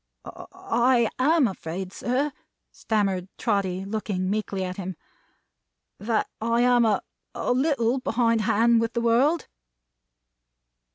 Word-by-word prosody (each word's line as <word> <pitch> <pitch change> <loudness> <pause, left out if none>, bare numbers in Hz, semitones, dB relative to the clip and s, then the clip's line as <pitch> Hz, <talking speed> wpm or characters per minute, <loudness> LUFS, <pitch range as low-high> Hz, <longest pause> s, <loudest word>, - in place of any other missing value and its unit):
"I 235 -1 0
am 295 +1 +4
afraid, 185 0 -6
sir," 270 +5 -1 0.4
stammered 195 -4 -1
Trotty, 195 -4 -1
looking 195 -3 -2
meekly 205 -2 -2
at 180 0 -5
him, 190 -1 -5 1.0
"that 220 +1 0
I 230 +1 +1
am 245 -1 +4
a 215 -2 +1 0.3
a - - -1
little 260 -2 +1
behind 230 -2 +1
hand 225 +2 +3
with 230 +1 -2
the 235 - -1
world." 255 +8 +2
230 Hz, 115 wpm, -25 LUFS, 195-245 Hz, 1.0 s, am